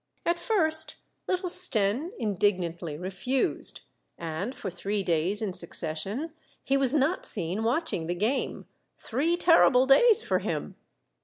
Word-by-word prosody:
At 340 0 0
first 315 -8 +2 0.3
little 365 -1 -2
Stenne 255 - +1
indignantly 180 - -1
refused; 190 - -1 0.4
and 170 +10 -5
for 215 -8 -6
three 195 +4 -3
days 180 +5 0
in 195 -4 -3
succession 180 - -1 0.3
he 270 - 0
was 275 0 +3
not 300 +6 +1
seen 190 +2 -3
watching 235 - -1
the 175 - -2
game, 225 +9 -2 0.2
— - - -49
three 315 +9 -1
terrible 275 -7 +5
days 445 - +5
for - - 0
him. - - -4
225 Hz, 135 wpm, -27 LUFS, -, 0.4 s, terrible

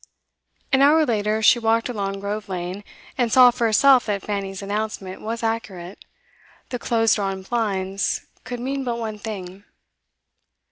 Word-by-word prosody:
An 265 - +5
hour 305 +3 +5
later, 215 -2 0
she 240 - +6
walked 225 0 +1
along 195 -4 -3
Grove 205 +1 -4
Lane, 180 +2 -4 0.4
and 240 -2 +1
saw 250 0 +8
for 240 -1 0
herself 255 +3 +5
that 200 -2 -2
Fanny's 195 -1 -4
announcement 205 -2 -4
was 230 +2 -4
accurate; 200 -5 -4 0.7
the 245 - -4
close 225 -1 +2
drawn 195 -2 -2
blinds 195 -3 -1 0.2
could 245 -1 -6
mean 270 +2 -3
but 240 -2 -2
one 220 -2 -5
thing. 195 -3 -7
215 Hz, 145 wpm, -22 LUFS, 195-235 Hz, 0.7 s, saw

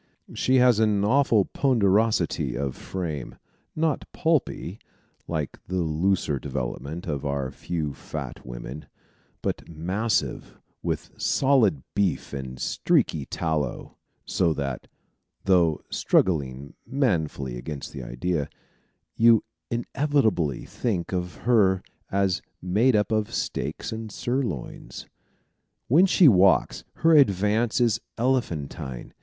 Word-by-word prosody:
She 130 - +2
has 125 -3 +5
an 105 -2 +2
awful 120 -4 +4
ponderosity 110 -4 +2
of 70 -1 -2
frame, 80 -8 -5 0.4
not 155 -2 -1
pulpy, 160 -3 -1 0.5
like 75 -5 -3
the 90 -1 0
looser 80 -2 0
development 70 +4 -4
of 75 -4 -3
our 70 -2 -2
few 80 -5 -3
fat - - -7
women, 60 +4 -8 0.6
but - - -3
massive 95 +8 -2 0.2
with - - -3
solid 115 - +3
beef 100 -7 0
and 65 -2 -6
streaky 70 +2 +1
tallow; 80 -5 -2 0.3
so 85 -3 +1
that 70 -3 -4 0.6
(though 85 -5 +3
struggling 70 -6 +1
manfully 80 - 0
against 70 +4 -6
the 65 - -6
idea) 70 +6 -2 0.7
you 115 -1 +5 0.3
inevitably 120 - 0
think 95 -7 -2
of 90 -1 -2
her 100 -6 +4 0.3
as 95 -2 +1 0.2
made 110 +8 +2
up 105 +1 +1
of 110 -1 0
steaks - - -3
and 110 -1 -5
sirloins. 120 - -4 0.8
When 170 +10 +6
she 180 -2 +6
walks, 95 -5 +4 0.2
her 165 -1 +7
advance 110 -2 +3
is 120 -4 +2 0.2
elephantine. 85 - -2
95 Hz, 110 wpm, -25 LUFS, 75-115 Hz, 0.8 s, her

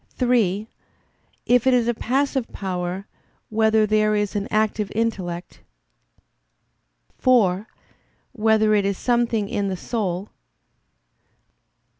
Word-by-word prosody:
(3) 220 -5 +1 0.8
If 245 +1 +3
it 260 - +5
is 240 -2 +2
a 240 - +2
passive 265 +2 -1
power, 185 0 -4 0.5
whether 220 0 +3
there 215 0 +2
is 210 0 -1
an 205 0 -2
active 215 -1 0
intellect? 185 -6 -3 1.6
(4) 215 -6 +3 0.6
Whether 220 -2 +2
it 205 -1 +3
is 200 -1 -1
something 235 -4 0
in 200 0 -2
the 190 -1 -3
soul? 195 -3 -3
215 Hz, 105 wpm, -22 LUFS, 195-230 Hz, 1.6 s, it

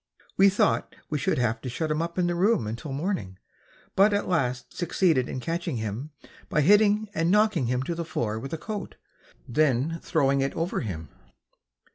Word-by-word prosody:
We 195 +1 +6
thought 205 +2 +1 0.2
we 150 - 0
should - - 0
have 115 -2 0
to 130 - -5
shut 155 +6 -2
him 155 +1 0
up 170 +1 -4
in 180 - +2
the 175 - +1
room 185 - +2
until 115 +7 -5
morning, 140 - -3 0.6
but 205 +2 +5
at 205 - 0
last 125 -8 -1
succeeded 165 -6 +1
in - - -4
catching 165 -1 -3
him 110 +6 -4 0.4
by 150 - +2
hitting 210 +5 +4
and 165 -3 +1
knocking 210 - +3
him 125 +1 0
to 170 - -3
the 170 0 -3
floor 115 -9 -2
with 135 +4 -7
a 165 - -2
coat, 205 +2 -6 0.5
then 150 +4 +1
throwing 140 -3 +2
it 135 - -1
over 165 +2 -1
him. 80 - -5
155 Hz, 185 wpm, -26 LUFS, 125-185 Hz, 0.6 s, We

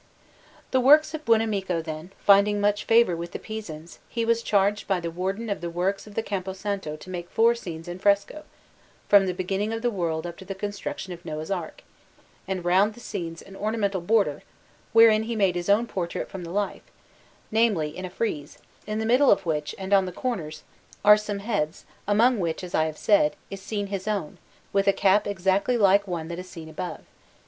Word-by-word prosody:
The 260 - +3
works 300 +4 +6
of 310 -1 -6
Buonamico, 210 -6 +1
then, 160 +2 -6
finding 205 +1 +4
much 205 0 +1
favour 225 -6 +4
with 170 +1 -6
the - - -3
Pisans, 175 -7 -8
he 230 -1 -1
was 230 0 +2
charged 205 -1 +1
by 190 -2 +1
the 170 -1 -4
Warden 190 +6 -3
of 200 -4 -3
the 170 - -3
Works 185 +5 -2
of 205 - -13
the 225 - -1
Campo 190 -3 -3
Santo 195 -5 -4
to 155 - -12
make 175 -1 -6
four 230 +1 +4
scenes 170 -8 -8
in 175 +1 -6
fresco, 200 +10 +1 0.6
from 200 -2 +6
the 180 - -1
beginning 195 +4 -2
of 225 +1 -4
the 240 - +2
world 170 -5 -2
up 170 0 -6
to 190 - -10
the 195 +1 -5
construction 200 -2 -5
of 175 0 -12
Noah's 155 +1 -5
Ark, 175 -5 -4 0.6
and 185 -2 -3
round 195 +4 +3
the - - -13
scenes 165 -7 -6
an 195 - -13
ornamental 205 -2 -1
border, 210 +3 +1 0.5
wherein 225 -1 +7
he 230 +1 -3
made 195 -4 +2
his 175 +1 -4
own 210 +4 +4
portrait 180 -6 -4
from 190 -2 -6
the 170 - -7
life 200 +3 -3 0.6
namely, 210 -10 +1
in 185 - -6
a 185 - -4
frieze, 170 -7 -4 0.3
in 215 0 -2
the 220 - -1
middle 255 +5 +4
of 195 -1 +3
which, 150 -2 -2
and 190 +1 -3
on 195 -1 +4
the - - -4
corners, 165 -9 -4 0.4
are 210 0 +10
some 210 -1 -3
heads, 180 -8 -2 0.2
among 225 +3 +4
which, 170 0 -2
as 180 - -8
I 155 - +3
have 155 -1 -5
said, 200 -8 +3 0.2
is 195 -1 -6
seen 205 0 -3
his 195 0 -5
own, 200 -8 -3 0.3
with 195 0 +2
a 200 - +6
cap 200 +2 +3
exactly 195 +5 +1
like 200 -1 +4
the - - -12
one 165 -2 -3
that 170 +1 -5
is 185 0 -9
seen 160 -2 -9
above. 160 +3 -6
195 Hz, 210 wpm, -25 LUFS, 175-215 Hz, 0.6 s, are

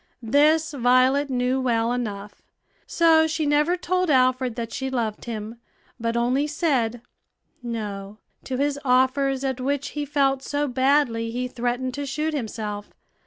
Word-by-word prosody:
This 305 +7 +3
Violet 260 +2 +3
knew 255 +1 0
well 230 -2 +1
enough; 205 -4 -5 0.5
so 320 -1 +4
she 315 0 -1
never 295 +4 +2
told 365 0 0
Alfred 255 -3 +2
that 230 -2 -5
she 265 0 -3
loved 230 -5 -3
him, 225 0 -6 0.4
but 230 0 -1
only 255 +5 +1
said 260 -7 0 0.6
"No" 210 -4 -5 0.3
to 260 - -3
his 285 +1 0
offers, 265 +1 +2
at 265 -1 -2
which 280 +1 -1
he 295 - -4
felt 275 -2 +1
so 290 +1 -2
badly 260 -3 +1
he 250 +2 -3
threatened 245 +1 -2
to 285 +1 -4
shoot 305 +3 -2
himself. 215 -6 -4
260 Hz, 145 wpm, -24 LUFS, 235-285 Hz, 0.6 s, so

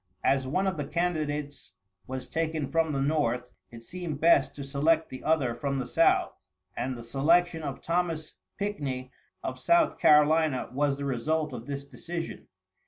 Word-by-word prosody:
As 135 -1 +2
one 185 +9 0
of 190 -3 -1
the 145 - -2
candidates 150 - -2 0.3
was 130 0 -5
taken 160 -3 -1
from 165 0 +2
the 140 - -1
North, 125 -5 0 0.2
it 115 -1 -12
seemed 170 0 -5
best 160 -4 +4
to 145 - -6
select 155 +4 +1
the 130 - -8
other 150 -6 +2
from 140 +2 -2
the 130 - -2
South, - - +2 0.3
and 130 0 -3
the 120 - -8
selection 165 +7 +2
of 140 -4 -5
Thomas 165 -2 -1 0.3
Pickney, 140 -11 -3 0.3
of - - -4
South 340 -1 +3
Carolina, 150 -2 +4
was 140 +1 +1
the 140 - -4
result 150 +3 -1
of 120 -1 -7
this 140 0 -4
decision. 165 +5 -6
150 Hz, 165 wpm, -28 LUFS, 135-165 Hz, 0.3 s, best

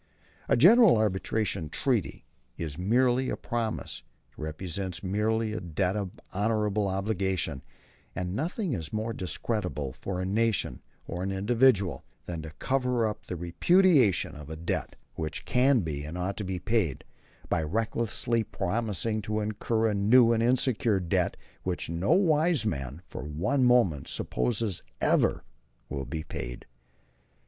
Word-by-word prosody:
A - - +4
general 205 - +7
arbitration 100 -4 0
treaty 120 - -1 0.3
is 80 -4 -4
merely 125 - +2
a - - -2
promise; 115 -3 -3 0.3
it - - -35
represents 90 +4 -4
merely 105 +3 0
a 110 - -2
debt 90 +2 -1
of 100 -3 -4
honorable 105 0 +1
obligation; 95 -7 -1 0.5
and 90 +1 -3
nothing 170 - -2
is 80 -8 -4
more 110 +1 -2
discreditable, 90 - -3
for 95 +5 -5
a 95 - -1
nation 110 +3 0 0.2
or 85 +1 -5
an 95 +1 -1
individual, 105 -1 +2 0.2
than 85 -2 -4
to 80 - -7
cover 125 -3 +1
up 105 -1 -4
the 90 - -3
repudiation 125 - +3
of 75 0 -10
a 80 - -5
debt 80 +2 -3 0.2
which 80 -2 -5
can 130 -1 +3
be 75 -4 -4
and 75 +4 -6
ought 90 +2 -2
to 105 - -3
be 95 -1 -3
paid, 100 - 0 0.4
by - - +1
recklessly 115 +5 -1
promising 110 +1 -1
to 105 +1 -2
incur 110 +2 0
a 110 - +1
new 115 +4 +5
and 115 - +1
insecure 120 -3 +2
debt 85 -2 0 0.2
which 90 -2 -3
no 85 +4 -2
wise 165 - +3
man 70 - -3
for - - -7
one 85 - 0
moment 115 - +3
supposes 80 - -1 0.2
ever - - +2 0.5
will 70 0 -3
be 80 +1 -4
paid. - - -6
105 Hz, 145 wpm, -28 LUFS, 85-115 Hz, 0.5 s, general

